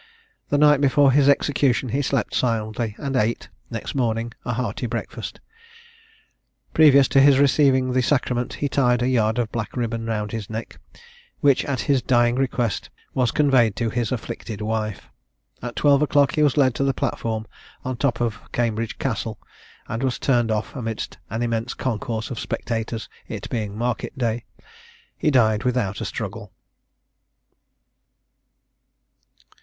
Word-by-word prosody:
The 145 Hz, -, +2 dB
night 150 Hz, -1 st, +5 dB
before 140 Hz, 0 st, +5 dB
his 140 Hz, +1 st, +4 dB
execution 140 Hz, -3 st, +2 dB
he 135 Hz, +5 st, 0 dB
slept 125 Hz, -2 st, -1 dB
soundly, 110 Hz, -3 st, -1 dB
and 135 Hz, -2 st, -3 dB
ate, 115 Hz, -1 st, 0 dB, 0.2 s
next 115 Hz, -2 st, -5 dB
morning, 115 Hz, -3 st, -1 dB
a 120 Hz, -, -2 dB
hearty 120 Hz, 0 st, -2 dB
breakfast. 115 Hz, 0 st, -5 dB, 1.3 s
Previous 140 Hz, -3 st, +6 dB
to 135 Hz, -, +5 dB
his 140 Hz, -1 st, +6 dB
receiving 135 Hz, -2 st, +3 dB
the 130 Hz, -, +3 dB
sacrament 125 Hz, -2 st, 0 dB
he 145 Hz, -, -1 dB
tied 125 Hz, -3 st, +2 dB
a -, -, +1 dB
yard 115 Hz, -3 st, +2 dB
of 120 Hz, -3 st, -1 dB
black 115 Hz, +1 st, -4 dB
ribbon 115 Hz, -1 st, -2 dB
round 105 Hz, -2 st, -2 dB
his 110 Hz, -4 st, -5 dB
neck, 110 Hz, +1 st, -6 dB, 0.6 s
which, 140 Hz, -2 st, +4 dB
at 140 Hz, -3 st, -1 dB
his 140 Hz, -3 st, +2 dB
dying 120 Hz, -1 st, +3 dB
request, 125 Hz, -4 st, -1 dB, 0.2 s
was 125 Hz, -2 st, +2 dB
conveyed 125 Hz, -6 st, +3 dB
to 115 Hz, -2 st, -1 dB
his 120 Hz, -1 st, -1 dB
afflicted 115 Hz, -3 st, -5 dB
wife. 110 Hz, -1 st, -3 dB, 0.5 s
At 120 Hz, 0 st, -6 dB
twelve 140 Hz, -1 st, +4 dB
o'clock 145 Hz, -3 st, +3 dB
he 150 Hz, -, +1 dB
was 150 Hz, -1 st, +3 dB
led 130 Hz, -3 st, +4 dB
to -, -, +4 dB
the 135 Hz, -1 st, +1 dB
platform, 110 Hz, -1 st, -2 dB, 0.4 s
on 130 Hz, -, -1 dB
the 120 Hz, -, -9 dB
top 125 Hz, -5 st, +1 dB
of 115 Hz, -2 st, -1 dB
Cambridge 115 Hz, -2 st, -1 dB
Castle, -, -, -3 dB, 0.5 s
and 115 Hz, +2 st, -3 dB
was 130 Hz, -2 st, 0 dB
turned 120 Hz, -4 st, +2 dB
off 110 Hz, 0 st, -2 dB
amidst 115 Hz, -4 st, -5 dB
an 110 Hz, +3 st, -2 dB
immense 115 Hz, 0 st, -2 dB
concourse 115 Hz, -1 st, -3 dB
of 120 Hz, -, -4 dB
spectators, 115 Hz, -1 st, -3 dB, 0.2 s
it -, -, -6 dB
being 105 Hz, -3 st, -3 dB
market 120 Hz, +4 st, -2 dB
day. 115 Hz, -2 st, -1 dB, 0.7 s
He 155 Hz, -, +1 dB
died 110 Hz, -5 st, +3 dB
without 120 Hz, -6 st, -1 dB
a -, -, -2 dB
struggle. -, -, -5 dB
120 Hz, 155 wpm, -23 LUFS, 115-135 Hz, 1.3 s, Previous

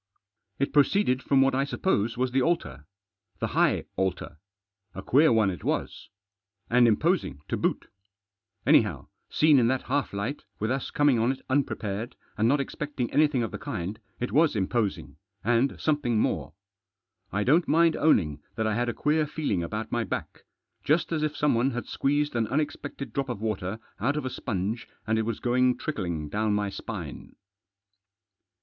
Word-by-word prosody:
It 140 Hz, -, -1 dB
proceeded 145 Hz, -2 st, +3 dB
from 135 Hz, 0 st, +4 dB
what 135 Hz, -, +2 dB
I 135 Hz, +1 st, +2 dB
sup 140 Hz, -, -6 dB
pose 115 Hz, -, +1 dB
was 130 Hz, 0 st, 0 dB
the 130 Hz, +1 st, +2 dB
altar. 75 Hz, -, -1 dB, 0.5 s
The -, -, -2 dB
high -, -, +2 dB
altar. 95 Hz, -5 st, -2 dB, 0.6 s
A 95 Hz, -, -6 dB
queer 145 Hz, +8 st, +5 dB
one 110 Hz, -4 st, +3 dB
it 90 Hz, -, -8 dB
was. -, -, -3 dB, 0.6 s
And 120 Hz, 0 st, +6 dB
imposing 115 Hz, -, +1 dB
to -, -, 0 dB
boot. -, -, -1 dB, 0.8 s
Anyhow, -, -, +3 dB, 0.2 s
seen 150 Hz, -3 st, +5 dB
in 115 Hz, -, +3 dB
that 130 Hz, +1 st, 0 dB
half 145 Hz, -1 st, -1 dB
light, 105 Hz, +9 st, -4 dB
with 110 Hz, +3 st, -1 dB
us 135 Hz, 0 st, -2 dB
coming 145 Hz, -5 st, +3 dB
on 115 Hz, +3 st, +2 dB
it 135 Hz, -, -6 dB
unprepared, 120 Hz, -4 st, -1 dB, 0.2 s
and 110 Hz, +1 st, +2 dB
not 140 Hz, +4 st, +3 dB
expecting 140 Hz, -2 st, -4 dB
anything 145 Hz, -5 st, +3 dB
of 115 Hz, -, -3 dB
the -, -, -6 dB
kind, 105 Hz, -, -4 dB, 0.2 s
it 125 Hz, -, -2 dB
was 155 Hz, -1 st, +3 dB
imposing, 105 Hz, +1 st, -1 dB, 0.3 s
and 120 Hz, +4 st, +1 dB
something 145 Hz, -7 st, +1 dB
more. 75 Hz, -7 st, -1 dB, 0.8 s
I 100 Hz, +1 st, 0 dB
don't 160 Hz, +9 st, +3 dB
mind 165 Hz, +1 st, +4 dB
owning 80 Hz, -, +2 dB
that 110 Hz, -, -1 dB
I 110 Hz, -, +1 dB
had 120 Hz, +2 st, 0 dB
a -, -, -3 dB
queer 150 Hz, +1 st, +1 dB
feeling 145 Hz, -, -1 dB
about 110 Hz, +6 st, -4 dB
my 120 Hz, -1 st, 0 dB
back. -, -, -5 dB, 0.4 s
Just 160 Hz, +4 st, +1 dB
as 160 Hz, -2 st, 0 dB
if 155 Hz, -1 st, -1 dB
someone 135 Hz, -3 st, +2 dB
had 120 Hz, -, -4 dB
squeezed 145 Hz, 0 st, 0 dB
an 115 Hz, -2 st, +1 dB
unexpected 145 Hz, +1 st, -3 dB
drop 135 Hz, -1 st, -2 dB
of 120 Hz, -5 st, -3 dB
water 105 Hz, -2 st, -2 dB, 0.2 s
out 140 Hz, +8 st, 0 dB
of 150 Hz, -, -3 dB
a 130 Hz, -, -3 dB
sponge, 110 Hz, +2 st, -3 dB, 0.2 s
and 110 Hz, 0 st, +1 dB
it 110 Hz, -, -1 dB
was 115 Hz, -, -2 dB
going 125 Hz, 0 st, +2 dB
trickling 85 Hz, -, -3 dB
down 105 Hz, +5 st, 0 dB
my 105 Hz, -1 st, -1 dB
spine. -, -, -7 dB
120 Hz, 175 wpm, -27 LUFS, 105-145 Hz, 0.8 s, And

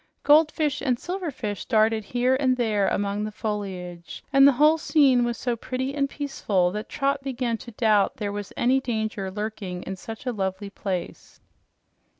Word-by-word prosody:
Goldfish 305 Hz, -1 st, +3 dB
and 255 Hz, -4 st, +1 dB
silverfish 280 Hz, -, -4 dB
darted 220 Hz, -1 st, +3 dB
here 245 Hz, +4 st, +1 dB
and 260 Hz, -2 st, +1 dB
there 215 Hz, -5 st, +1 dB
among 200 Hz, +1 st, -1 dB
the 215 Hz, -, -3 dB
foliage, 190 Hz, -6 st, -5 dB
and 275 Hz, 0 st, +8 dB
the 280 Hz, -, +6 dB
whole 305 Hz, +5 st, +4 dB
scene 275 Hz, -6 st, +4 dB
was 240 Hz, -1 st, -1 dB
so 245 Hz, -2 st, -1 dB
pretty 260 Hz, +3 st, -3 dB
and 275 Hz, -1 st, 0 dB
peaceful 205 Hz, -12 st, 0 dB
that 210 Hz, +2 st, -5 dB
Trot 275 Hz, 0 st, 0 dB
began 250 Hz, -4 st, -2 dB
to -, -, -10 dB
doubt 215 Hz, -3 st, +2 dB
there 205 Hz, -2 st, -3 dB
was 205 Hz, -1 st, -6 dB
any 255 Hz, +2 st, +3 dB
danger 220 Hz, -6 st, -3 dB
lurking 200 Hz, -3 st, -5 dB
in 190 Hz, -, -5 dB
such 225 Hz, +6 st, -9 dB
a 250 Hz, -, 0 dB
lovely 195 Hz, -1 st, -3 dB
place. 185 Hz, -3 st, -5 dB
225 Hz, 165 wpm, -25 LUFS, 205-270 Hz, -, and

